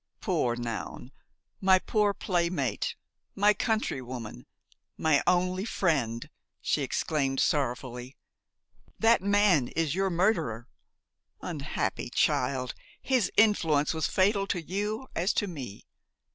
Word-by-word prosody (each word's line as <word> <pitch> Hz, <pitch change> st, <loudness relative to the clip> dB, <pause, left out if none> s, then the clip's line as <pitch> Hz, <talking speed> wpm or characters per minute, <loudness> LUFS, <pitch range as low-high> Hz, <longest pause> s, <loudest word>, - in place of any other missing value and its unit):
"Poor 120 Hz, -1 st, 0 dB
Noun! 120 Hz, +1 st, -5 dB, 0.5 s
my 190 Hz, -1 st, +5 dB
poor 210 Hz, +1 st, +1 dB
playmate! 170 Hz, -, -1 dB, 0.4 s
my 205 Hz, +1 st, +5 dB
countrywoman, 130 Hz, -, -3 dB, 0.5 s
my 155 Hz, -3 st, +3 dB
only 180 Hz, +1 st, +2 dB
friend!" 135 Hz, -, 0 dB, 0.3 s
she -, -, 0 dB
exclaimed 135 Hz, -4 st, -1 dB
sorrowfully; 125 Hz, -2 st, -1 dB, 0.8 s
"that 225 Hz, -1 st, +4 dB
man 200 Hz, -8 st, +3 dB
is 160 Hz, -1 st, -1 dB
your 195 Hz, +1 st, +1 dB
murderer. 170 Hz, -, 0 dB, 0.7 s
Unhappy 150 Hz, -5 st, -3 dB
child! 130 Hz, 0 st, +1 dB, 0.3 s
his 250 Hz, -8 st, +1 dB
influence 165 Hz, -10 st, +3 dB
was 160 Hz, -1 st, 0 dB
fatal 195 Hz, +1 st, +2 dB
to 180 Hz, -, -1 dB
you 210 Hz, -, -3 dB
as 180 Hz, +4 st, +1 dB
to -, -, +1 dB
me! 135 Hz, -, -8 dB
165 Hz, 105 wpm, -28 LUFS, 130-195 Hz, 0.8 s, my